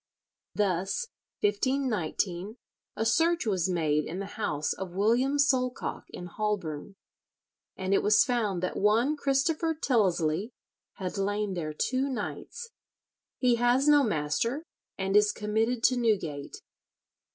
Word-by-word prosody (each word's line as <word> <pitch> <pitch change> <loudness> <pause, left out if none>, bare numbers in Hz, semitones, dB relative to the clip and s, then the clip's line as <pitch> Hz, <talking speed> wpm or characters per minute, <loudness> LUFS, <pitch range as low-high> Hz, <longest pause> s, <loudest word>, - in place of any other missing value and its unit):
Thus, 195 - 0 0.3
1519, 220 - -1 0.4
a 220 - -1
search 330 +7 +2
was 190 -4 0
made 155 -4 +1
in 175 - -5
the 195 - -4
house 150 -8 -1
of 185 -2 -7
William 240 +8 +2
Solcocke 260 -3 0
in 180 - -8
Holborne, 195 -3 -3 0.8
and 190 +1 -1
it - - +4
was 210 0 +5
found 215 -8 -1
that 185 - -2
one 225 +8 +3
Christopher 305 +4 +1
Tyllesley 200 - +1 0.4
had 190 +1 -5
lain 205 0 -1
there 160 -4 -3
two 265 - 0
nights. 465 - -5 0.7
"He 245 -2 +3
has 245 +4 +3
no 295 -1 +7
master, 225 - -1 0.3
and 195 0 -1
is 210 0 +5
committed 225 +3 -1
to 255 - +4
Newgate." 185 -12 -1
210 Hz, 125 wpm, -28 LUFS, 185-260 Hz, 0.8 s, no